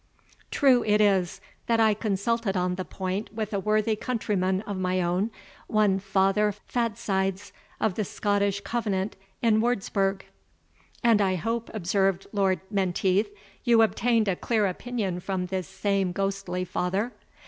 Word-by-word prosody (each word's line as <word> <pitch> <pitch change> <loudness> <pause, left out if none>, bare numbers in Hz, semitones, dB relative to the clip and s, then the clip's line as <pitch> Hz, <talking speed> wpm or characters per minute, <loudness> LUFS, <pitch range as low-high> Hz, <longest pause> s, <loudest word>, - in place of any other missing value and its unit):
True 260 -4 +4
it 210 0 +3
is, 195 -4 +2 0.3
that 230 -1 +2
I 220 -1 +5
consulted 205 0 -1
on 180 0 0
the 185 +1 -3
point 190 +3 -4
with 215 -1 -3
a 200 - +1
worthy 215 +2 +1
countryman 205 -5 -1
of 205 -2 -4
my 185 0 0
own, 180 +4 0 0.4
one 210 -3 +2
Father 195 +2 +2
Fatsides, 200 -3 -2 0.3
of 220 - +1
the 215 - -1
Scottish 200 0 0
Covenant 200 -2 -2 0.3
in 220 -2 +4
Wurtzburg 195 -4 0 0.4
" - - -40 0.3
"And 230 -3 +5
I 190 -2 +2
hope," 230 +6 -2
observed 195 -1 0
Lord 190 -4 +1
Menteith, 195 +1 +1 0.3
"you 235 -2 +5
obtained 225 0 +2
a 190 - +2
clear 220 +2 +1
opinion 195 -1 -2
from 185 0 -2
this 185 0 -3
same 195 -1 0
ghostly 195 -2 -2
father?" 190 +7 -1
200 Hz, 145 wpm, -26 LUFS, 190-215 Hz, 0.4 s, I